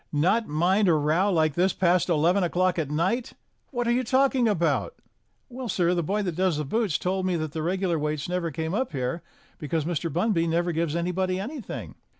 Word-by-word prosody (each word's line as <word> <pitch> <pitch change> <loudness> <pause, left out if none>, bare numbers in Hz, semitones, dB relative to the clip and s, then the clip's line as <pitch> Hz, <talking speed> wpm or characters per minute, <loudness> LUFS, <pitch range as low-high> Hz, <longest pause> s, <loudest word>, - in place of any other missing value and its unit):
"Not 185 +10 +2
mind 180 +7 +2
a 170 - +5
row 155 +7 +2
like 155 -4 +2
this 180 +4 +2
past 180 0 +2
eleven 175 +4 +3
o'clock 180 0 +1
at 150 -4 -2
night! 185 +11 -1 0.4
What 245 -3 -2
are - - +3
you 250 +2 +1
talking 260 0 +2
about?" 200 - 0 0.5
"Well, 255 -1 -7
sir, 180 -2 +2
the 175 - +1
boy 200 +6 -1
that 180 -4 -3
does 185 -3 +1
the 150 - -2
boots 210 +2 0
told 185 +1 -1
me 180 - +1
that 155 -2 -3
the 160 0 -4
regular 180 0 0
waits 150 0 -2
never 180 -1 -1
came 160 +3 -4
up 235 -4 -1
here, 130 +5 -2 0.4
because 155 -1 -2
Mr. 165 -1 -2
Bunby 170 0 +1
never 175 +2 +1
gives 165 -1 -1
anybody 185 +2 -1
anything." 245 +2 -6
175 Hz, 200 wpm, -26 LUFS, 160-195 Hz, 0.5 s, a